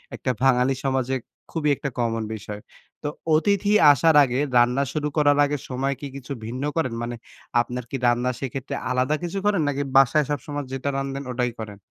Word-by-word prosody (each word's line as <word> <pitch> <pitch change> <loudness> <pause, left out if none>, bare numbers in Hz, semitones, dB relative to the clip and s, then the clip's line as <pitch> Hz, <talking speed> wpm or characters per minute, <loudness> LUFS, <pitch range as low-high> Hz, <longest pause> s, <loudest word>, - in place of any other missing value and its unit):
একটা 130 - -1
বাঙালি 130 0 +4
সমাজে 130 -1 0 0.4
খুবই 155 -3 0
একটা 140 - -4
কমন 115 -1 0
বিষয়। 105 0 -8 0.4
তো - - -1 0.3
অতিথি 200 +4 +2 0.2
আসার 155 +3 +4
আগে 130 -1 0 0.2
রান্না 125 +3 +4
শুরু 150 -1 -1
করার 145 -1 +4
আগে 145 +1 -1
সময় 135 +2 -1
কি 145 - -4
কিছু 135 -1 -9
ভিন্ন 125 +4 -5
করেন? 160 -8 0
মানে 120 0 -3 0.5
আপনার 125 +1 -5
কি - - -4
রান্না 120 +1 +2
সেক্ষেত্রে 135 0 -4 0.2
আলাদা 130 +4 +1
কিছু 175 +3 -3
করেন 205 -4 +3
নাকি 140 -1 -1 0.2
বাসায় 135 +3 +5
সবসময় 145 0 -3
যেটা 135 +1 -2
রান্ধেন 135 0 -3
ওটাই 125 0 -1
করেন? 105 -2 -7
135 Hz, 175 wpm, -24 LUFS, 125-145 Hz, 0.5 s, বাসায়